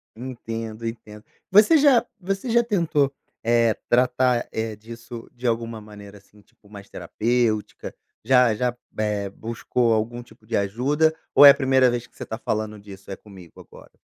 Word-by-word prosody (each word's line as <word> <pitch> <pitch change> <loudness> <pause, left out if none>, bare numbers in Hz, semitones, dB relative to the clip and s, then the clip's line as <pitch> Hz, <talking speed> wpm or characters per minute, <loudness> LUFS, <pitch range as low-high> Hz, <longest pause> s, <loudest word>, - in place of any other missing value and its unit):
Entendo, 115 -2 -7
entendo. 110 -2 -9 0.3
Você 210 +11 +6
já 275 -5 +4
você 195 +5 -4
já 235 +1 +3
tentou, 165 - 0 0.3
eh, 115 -1 +2
tratar, 125 0 +2
eh, 110 -1 -3
disso 115 +2 -11
de 125 +1 -11
alguma 115 -1 -2
maneira, 105 -1 -13
assim, 100 +1 -22
tipo, 100 - -28
mais 100 -1 -12
terapêutica, 115 -2 -2 0.3
já 125 -1 +4
já, 125 +2 -1 0.2
eh, 105 -2 -1
buscou 115 +3 -1
algum 120 +3 -2
tipo 110 - -21
de 115 - -1
ajuda, 135 +11 +1 0.2
ou 145 - +9
é 140 - +12
a - - +4
primeira 130 -1 +3
vez 120 0 -3
que - - -34
você - - -7
está 110 - -6
falando 110 -2 -3
disso 100 -1 -12
é - - -4
comigo 95 -5 -16
agora? - - -16
115 Hz, 165 wpm, -23 LUFS, 105-130 Hz, 0.3 s, é